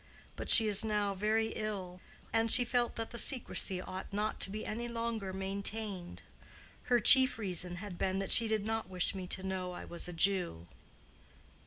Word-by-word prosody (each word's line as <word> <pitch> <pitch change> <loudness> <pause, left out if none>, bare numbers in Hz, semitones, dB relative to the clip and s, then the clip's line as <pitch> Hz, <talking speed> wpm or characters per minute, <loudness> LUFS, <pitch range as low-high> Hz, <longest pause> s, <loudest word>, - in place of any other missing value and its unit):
But - - -8
she 225 - +11
is 205 0 +5
now 210 -2 -2
very 215 +3 -2
ill, 190 -5 -7 0.3
and 225 0 0
she 245 - +4
felt 240 0 -2
that 225 0 -6
the 235 - -4
secrecy 220 -7 -1
ought 185 +2 -9
not 210 +2 -4
to - - +2
be 215 +2 -7
any 235 +2 -6
longer 230 -4 -5
maintained. 195 0 -6 0.6
Her 245 -1 +1
chief 260 +3 +9
reason 180 -4 -5
had 180 -1 -10
been 190 0 -2
that 195 0 -4
she 230 - +2
did 215 -2 -3
not 225 -3 -4
wish 185 -1 -2
me 185 -2 -8
to 185 - -7
know 185 -1 -5
I - - -10
was 170 +1 -3
a 175 - -8
Jew." 175 - -2
200 Hz, 185 wpm, -31 LUFS, 185-225 Hz, 0.6 s, she